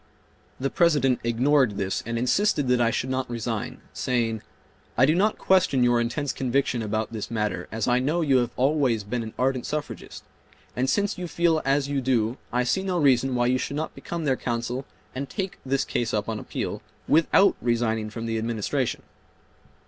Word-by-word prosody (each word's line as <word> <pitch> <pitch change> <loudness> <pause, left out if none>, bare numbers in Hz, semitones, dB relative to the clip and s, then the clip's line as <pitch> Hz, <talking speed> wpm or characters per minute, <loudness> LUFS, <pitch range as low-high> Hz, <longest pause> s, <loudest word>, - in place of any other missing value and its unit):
The 135 +1 -1
President 145 -7 +3
ignored 125 -1 +2
this 95 -1 -1
and 115 0 -2
insisted 145 - +2
that 125 -1 +3
I 115 - +4
should 130 +2 -2
not 130 -1 -2
resign, 115 -2 -4
saying, 115 -4 -1 0.6
"I 130 - +6
do 150 - +3
not 205 +5 +2
question 180 -9 +3
your 120 -1 +3
intense 135 +4 -2
conviction 130 -1 0
about 110 +1 -2
this 110 -2 -4
matter 105 -2 -2
as 110 -1 -2
I 125 0 +3
know 150 +7 0
you 140 -5 +3
have 120 -2 +1
always 130 -5 +2
been 115 +4 -3
an 110 -1 -7
ardent 130 -1 0
suffragist; 150 0 -5 0.5
and 130 +2 0
since 205 +1 0
you 180 - -3
feel 165 -2 +2
as 135 +1 +2
you 140 -1 -1
do 120 -1 +1
I 125 0 +1
see 155 +10 +1
no 190 -2 -1
reason 135 -4 +3
why 120 0 +2
you 130 +1 +2
should 140 - -3
not 155 - -3
become 170 -2 -5
their 135 -2 +2
counsel 120 +2 -3 0.3
and 135 +1 -4
take 190 +4 -4
this 135 0 0
case 115 -2 -1
up 105 -1 -1
on 110 -1 -3
appeal - - -4 0.3
without 165 +5 +4
resigning 115 -2 0
from 115 +1 -6
the 115 -1 -1
Administration." 110 -2 -2
125 Hz, 185 wpm, -25 LUFS, 115-145 Hz, 0.6 s, I